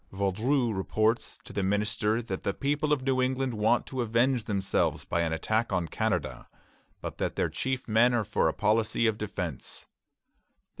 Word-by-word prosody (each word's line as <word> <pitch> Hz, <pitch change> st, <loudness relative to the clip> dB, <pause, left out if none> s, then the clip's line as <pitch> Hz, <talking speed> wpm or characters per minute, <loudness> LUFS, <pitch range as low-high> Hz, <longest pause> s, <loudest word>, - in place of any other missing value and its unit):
Vaudreuil 110 Hz, +6 st, +1 dB
reports 110 Hz, +4 st, 0 dB
to -, -, -11 dB
the 100 Hz, -, -1 dB
minister 105 Hz, +3 st, 0 dB
that 95 Hz, -4 st, -4 dB
the 100 Hz, -, -2 dB
people 145 Hz, +2 st, 0 dB
of 145 Hz, -3 st, +2 dB
New 130 Hz, -1 st, +1 dB
England 130 Hz, 0 st, 0 dB
want 110 Hz, +3 st, +2 dB
to 130 Hz, -2 st, -3 dB
avenge 120 Hz, +1 st, +2 dB
themselves 100 Hz, -3 st, 0 dB
by 85 Hz, -, 0 dB
an 80 Hz, -1 st, 0 dB
attack 110 Hz, +8 st, 0 dB
on 85 Hz, -2 st, 0 dB
Canada, 85 Hz, -, -2 dB, 0.5 s
but -, -, -6 dB
that -, -, -1 dB
their -, -, +1 dB
chief 130 Hz, -1 st, -3 dB
men 115 Hz, +3 st, +4 dB
are 120 Hz, -3 st, +1 dB
for 105 Hz, -, +1 dB
a -, -, +3 dB
policy 110 Hz, +2 st, +1 dB
of 110 Hz, -2 st, +3 dB
defence. 90 Hz, -, -4 dB
110 Hz, 170 wpm, -28 LUFS, 100-125 Hz, 0.5 s, men